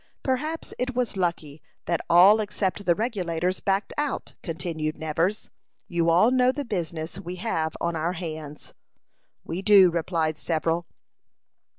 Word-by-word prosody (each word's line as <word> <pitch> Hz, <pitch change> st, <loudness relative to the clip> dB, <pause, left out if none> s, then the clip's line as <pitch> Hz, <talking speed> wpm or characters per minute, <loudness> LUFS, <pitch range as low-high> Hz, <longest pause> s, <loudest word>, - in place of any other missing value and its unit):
Perhaps 305 Hz, +5 st, -2 dB
it 255 Hz, 0 st, -2 dB
was 245 Hz, -4 st, -1 dB
lucky 170 Hz, -5 st, -2 dB, 0.2 s
that 170 Hz, -, 0 dB
all 190 Hz, +5 st, +7 dB
except 200 Hz, -1 st, -2 dB
the 175 Hz, -, +5 dB
Regulators 185 Hz, -5 st, -1 dB
backed 195 Hz, 0 st, -1 dB
out," 295 Hz, -2 st, -2 dB
continued 160 Hz, -2 st, -4 dB
Nevers. 165 Hz, +6 st, -1 dB, 0.4 s
"You 170 Hz, -1 st, +1 dB
all 180 Hz, +8 st, +5 dB
know 255 Hz, 0 st, +4 dB
the 285 Hz, +1 st, -5 dB
business 170 Hz, -5 st, -4 dB
we 180 Hz, -1 st, -6 dB
have 170 Hz, -5 st, -2 dB
on 170 Hz, 0 st, -1 dB
our 165 Hz, +3 st, -1 dB
hands." 155 Hz, -4 st, -7 dB, 0.7 s
"We 170 Hz, +3 st, -4 dB
do," 195 Hz, -3 st, +7 dB
replied 165 Hz, -2 st, -1 dB
several. 165 Hz, +1 st, -1 dB
175 Hz, 135 wpm, -25 LUFS, 165-210 Hz, 0.7 s, all